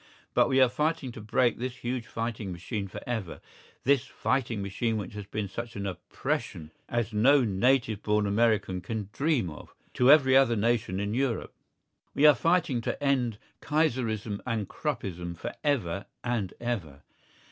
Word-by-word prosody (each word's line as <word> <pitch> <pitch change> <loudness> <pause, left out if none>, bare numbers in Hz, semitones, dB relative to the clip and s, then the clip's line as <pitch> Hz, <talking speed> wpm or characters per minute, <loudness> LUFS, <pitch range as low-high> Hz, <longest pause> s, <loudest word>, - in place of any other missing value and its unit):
But - - +4
we 135 - +3
are 130 - +7
fighting 150 0 -1
to 115 - -9
break 115 +3 +1
this 125 0 -3
huge 125 -1 -4
fighting 115 -3 -4
machine 100 +4 -4
for 95 - -8
ever—this 120 +4 -2
fighting 120 -5 -1
machine 110 +3 -1
which 105 -2 -5
has 105 -2 -7
been 105 -1 -3
such 115 +4 -6
an 100 0 -4
oppression 85 -3 -4 0.2
as 120 -1 -1
no 130 +6 +5
native 115 +1 +2
born 105 0 +1
American 105 -3 +1
can 105 +2 -4
dream 135 - +1
of, 75 - -12 0.2
to 125 - +4
every 135 -3 +7
other 135 -3 +5
nation 115 -3 0
in 100 +1 -2
Europe. 125 -2 -1 0.6
We 145 - +4
are 150 - +10
fighting 165 -8 +1
to 130 - -3
end 125 -6 +1 0.2
Kaiserism 115 -9 0
and 115 -5 -2
Kruppism 85 -2 -4
for - - -5
ever 100 - 0 0.2
and 120 -6 -1
ever. 90 - -4
115 Hz, 160 wpm, -28 LUFS, 100-130 Hz, 0.6 s, are